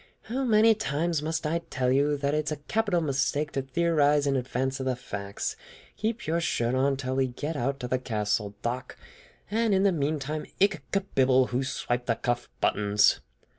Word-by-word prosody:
"How 260 +4 -2
many 225 -2 +5
times 165 -5 -1
must 160 +1 -2
I 165 +2 +1
tell 125 -1 0
you 145 +2 +2
that 140 0 -1
it 155 0 0
is 150 - -2
a - - 0
capital 210 -6 +1
mistake 145 0 0
to 135 - -1
theorize 150 0 +2
in 140 -1 +1
advance 130 +1 -1
of 130 - -3
the 130 - +1
facts! 100 -5 -5 0.4
Keep 225 +2 -2
your 165 +2 0
shirt 120 -7 0
on 135 +1 +2
till 130 -1 -3
we 135 -1 +2
get 145 +6 -4
out 140 +1 -1
to 125 - -3
the 130 +1 0
castle, 105 -3 -1
Doc; 125 +2 -3 0.5
and 225 -1 +2
in 190 - +3
the 200 - +5
meantime 150 -1 -2
ich 195 -2 +3
kebibble 130 -10 +2
who 125 +2 0
swiped 125 -2 -2
the 115 - +2
cuff 120 +1 -2
buttons!" 105 +5 +3
140 Hz, 190 wpm, -27 LUFS, 125-165 Hz, 0.5 s, many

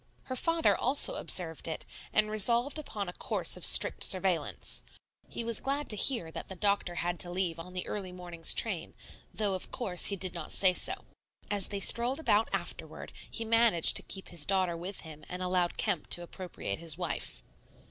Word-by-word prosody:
Her 255 - -6
father 330 +4 +1
also 270 +3 +4
observed 165 -4 +3
it, 160 - -4 0.3
and 215 0 0
resolved 235 +7 +2
upon 210 -9 -6
a 175 - -7
course - - -1
of - - -9
strict - - +7
surveillance. 175 - 0 0.5
He - - -6
was 230 -1 -1
glad 280 +2 -4
to - - 0
hear 205 -6 +2
that - - -8
the 190 - -8
doctor 200 -2 -1
had 175 0 -3
to 175 - -1
leave 175 -2 +2
on 180 +2 -10
the 180 -1 -4
early 195 -3 -6
morning's 175 -2 0
train, 190 -8 +1 0.4
though, 205 -3 -2
of 185 - -5
course, 190 -9 0
he 200 - +3
did 185 -1 0
not 170 -2 -8
say 185 -2 +4
so. - - -2 0.5
As 205 -2 +1
they 200 - -4
strolled 240 +7 +4
about 220 -8 +1
afterward, - - -6 0.2
he 225 - -5
managed 225 -6 +2
to - - -1
keep 190 - -3
his 170 -4 -2
daughter 185 0 0
with 180 +4 -7
him 155 -2 -12
and 180 0 -6
allowed 180 -1 -1
Kemp 190 -8 -2
to 175 - -2
appropriate 175 - -7
his 165 -2 -1
wife. 175 -3 -5
185 Hz, 190 wpm, -29 LUFS, 175-215 Hz, 0.5 s, strict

